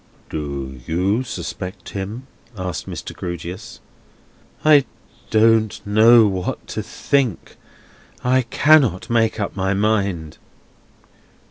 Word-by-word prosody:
"Do 70 -4 -5
you 95 +8 +1
suspect 95 -3 -6
him?" 105 +6 -6 0.3
asked 90 -2 -4
Mr. - - -7
Grewgious. 90 +3 -7 0.9
"I 150 -3 +6 0.4
don't 110 -1 +3
know 110 +3 +6
what 95 -3 -2
to - - -3
think. 135 -9 -1 0.7
I 130 +1 +3
cannot 130 - +3
make 115 -1 +2
up 100 - -3
my 95 0 0
mind." 100 -6 -1
100 Hz, 100 wpm, -20 LUFS, 90-115 Hz, 0.9 s, I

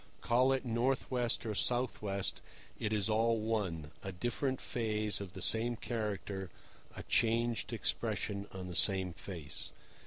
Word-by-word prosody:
Call 125 +3 +4
it 135 0 0
north 120 +4 +1
west 125 -1 0
or 110 - -1
south 125 +4 +1
west, 100 -2 -1 0.4
it 105 - -1
is 105 -3 +2
all 115 +1 +3
one—a 95 -6 -2
different 120 +7 -1
phase 110 -3 -1
of 95 -3 -7
the 95 - -4
same 115 +3 +4
character, 105 -4 -3 0.5
a - - -6
changed 115 -2 +2
expression 100 0 -1
on 95 -1 -6
the 90 - -6
same 95 0 +4
face. 80 -4 -5
110 Hz, 145 wpm, -34 LUFS, 95-120 Hz, 0.5 s, Call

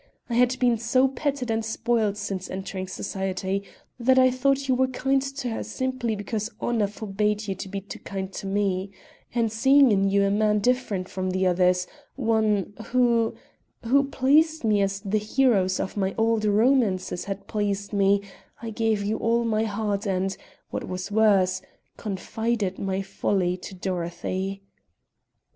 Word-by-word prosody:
I - - 0
had 250 +2 +3
been 245 -3 +2
so 255 +4 +3
petted 270 -2 -2
and 225 0 0
spoiled 220 -2 0
since 195 -3 -4
entering 190 0 -5
society 190 +1 -3 0.4
that 260 +2 +4
I 255 0 +6
thought 275 +2 +1
you 260 - +3
were 260 +1 +2
kind 270 +1 +1
to 275 -1 -4
her 225 - -3
simply 255 -4 -2
because 210 +1 -3
honor 225 -4 +1
forbade 210 +1 -2
you 195 - -1
to 190 +1 -7
be 195 0 -4
too 195 - -9
kind 195 -1 -5
to 195 - -5
me; 195 -1 0 0.5
and 230 -2 +1
seeing 265 +3 +5
in 195 -1 +3
you 200 0 +3
a 200 - +2
man 210 +1 +2
different 210 -4 0
from 185 0 -3
the 185 +1 0
others 180 0 +3 0.3
one 220 -5 +1
who 240 -2 +2 0.5
who 275 +4 +3
pleased 300 +4 +3
me 210 -2 +3
as 195 0 -1
the 205 +2 0
heroes 210 -4 +2
of - - -3
my 195 -2 -1
old 225 -1 +2
romances 210 -4 +2
had 195 -1 -5
pleased 205 -1 -2
me, 200 0 +3 0.4
I 230 0 -6
gave 220 -2 0
you 215 +2 -1
all 235 +1 +1
my 220 -1 +1
heart 210 0 -2
and, 190 0 0 0.4
what - - -4
was 185 +2 -5
worse, 195 -4 +3 0.4
confided 215 0 -2
my 195 0 -1
folly 185 -2 0
to 190 - -9
Dorothy. 185 +2 -3
210 Hz, 160 wpm, -25 LUFS, 195-235 Hz, 0.5 s, I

